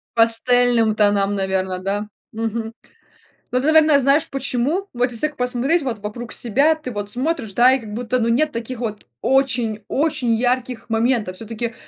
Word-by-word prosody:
Пастельным 230 0 +4
тонам, 205 -1 +2
наверно, 190 -1 -1
да? 200 +3 -3 0.2
Мгм. 225 0 -4 0.8
Ну 250 - +1
ты, 280 - -1
наверное, 310 -2 +5
знаешь 275 +3 +2
почему? 275 +8 -2
Вот 245 0 0
если 240 +6 +1
так 300 - -14
посмотреть 250 +7 0
вот 240 -5 -3
вокруг 220 +4 -7
себя, 275 +7 +2
ты 310 -5 -8
вот 205 -2 -4
смотришь, 250 -2 -2
да, 245 +5 +5
и, 265 - +1
как 215 -3 -9
будто, 245 +2 -2
ну 230 - 0
нет 300 +6 +2
таких 230 +1 -5
вот 215 -3 -5 0.2
очень-очень 250 0 0
ярких 245 0 -2
моментов. 225 -4 0
Всё-таки 225 +3 -5
240 Hz, 160 wpm, -20 LUFS, 220-260 Hz, 0.8 s, наверное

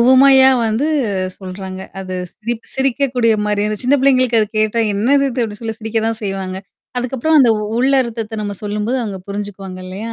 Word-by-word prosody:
உவமையா 265 +2 +7 0.2
வந்து 225 +6 0 0.5
சொல்றாங்க. 190 0 -7 0.2
அது 185 -1 -6 0.2
சிரிப் 230 +1 -5
சிரிக்கக்கூடிய 260 -3 +1
மாரியா 210 0 0
சின்ன 275 +3 +4
பிள்ளைங்களுக்கு 255 -4 +4
அது 215 - 0
கேட்டா 215 +2 +1
என்னது 270 +8 +3
இது 245 0 -1
அப்பிடி 210 -1 -7
சொல்லி 225 -1 -4
சிரிக்க 225 0 -1
தான் 225 -1 -3
செய்வாங்க. 195 -2 -3 0.4
அதுக்கப்புறம் 265 +5 +1
அந்த 245 -3 +5 0.3
உள்ள 265 +2 +3
அர்த்தத்த 225 -2 -5
நம்ம 205 -1 -4
சொல்லும்போது 210 +5 -1
அங்க 200 -3 -5
புரிஞ்சுக்குவாங்க 200 -2 -6
இல்லயா? 205 +5 -6
225 Hz, 160 wpm, -17 LUFS, 205-255 Hz, 0.5 s, உவமையா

